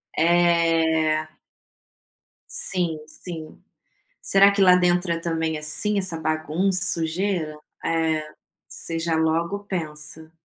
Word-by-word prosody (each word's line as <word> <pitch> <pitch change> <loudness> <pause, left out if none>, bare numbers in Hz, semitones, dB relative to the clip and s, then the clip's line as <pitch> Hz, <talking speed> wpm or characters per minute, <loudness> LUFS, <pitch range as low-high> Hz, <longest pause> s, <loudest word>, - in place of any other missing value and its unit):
É. 165 -2 +2 1.3
Sim, 175 -5 +2
sim. 160 0 -10 0.6
Será 195 +1 +5
que 200 0 0
lá 180 -1 +6
dentro 180 0 +1
é 165 - -1
também, 160 -1 -2
assim, 150 +8 +3
essa 185 -4 0
bagunça, 160 +5 -1
sujeira? 165 -2 -1 0.2
É, 160 -1 0 0.5
você 165 - -5
já 165 0 -2
logo 170 +5 -1
pensa. 160 -3 -5
165 Hz, 105 wpm, -23 LUFS, 160-180 Hz, 1.3 s, lá